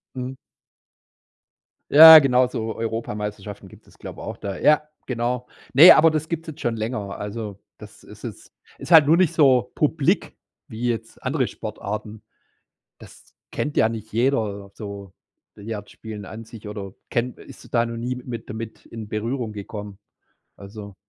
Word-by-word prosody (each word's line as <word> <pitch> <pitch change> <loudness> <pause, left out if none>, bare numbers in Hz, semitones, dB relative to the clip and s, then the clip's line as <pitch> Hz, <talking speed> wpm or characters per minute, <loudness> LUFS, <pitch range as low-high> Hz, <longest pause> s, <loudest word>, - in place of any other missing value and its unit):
Mhm. 130 +1 -5 1.6
Ja, 160 +2 +12
genau 130 -3 +3
so 115 -3 -4
Europameisterschaften 105 -3 -5
gibt - - -18
es, - - -22
glaube - - -9
ich, - - -8
auch - - -6
da. 100 -2 -5
Ja, 150 0 +3 0.2
genau. 125 0 -2 0.3
Ne, 155 +7 +10
aber 160 +1 +7
das 155 0 -3
gibt's 165 -1 -4
jetzt 160 0 -9
schon 115 -1 -1
länger. 110 -3 -4
Also, 105 -1 -6 0.2
das - - -14
ist - - -15
es - - -9 0.2
ist - - -9
halt 160 -4 +8
nur 165 +3 +5
nicht 185 -4 +2
so 130 -8 +3
publik 150 -1 0 0.3
wie 115 +3 -4
jetzt 115 -1 -4
andere - - -1
Sportarten. 105 +1 -7 0.7
Das - - -17 0.2
kennt 145 - -3
ja 110 - +4
nicht 110 -1 -7
jeder, 110 -5 -1
so 100 -3 -9 0.4
Billard 105 0 -7
spielen 105 -2 -9
an 110 +3 -9
sich 110 -1 -12
oder 100 -2 -7 0.2
kenn 120 +1 -1
ist - - -15
da 120 -1 +2
noch 115 0 -6
nie 125 +2 -3
mit 120 -2 -8
damit 110 0 -8
in 115 -2 -8
Berührung 110 +2 -3
gekommen, 105 -1 -8 0.6
also. 100 0 -11
115 Hz, 160 wpm, -23 LUFS, 105-125 Hz, 1.6 s, Ja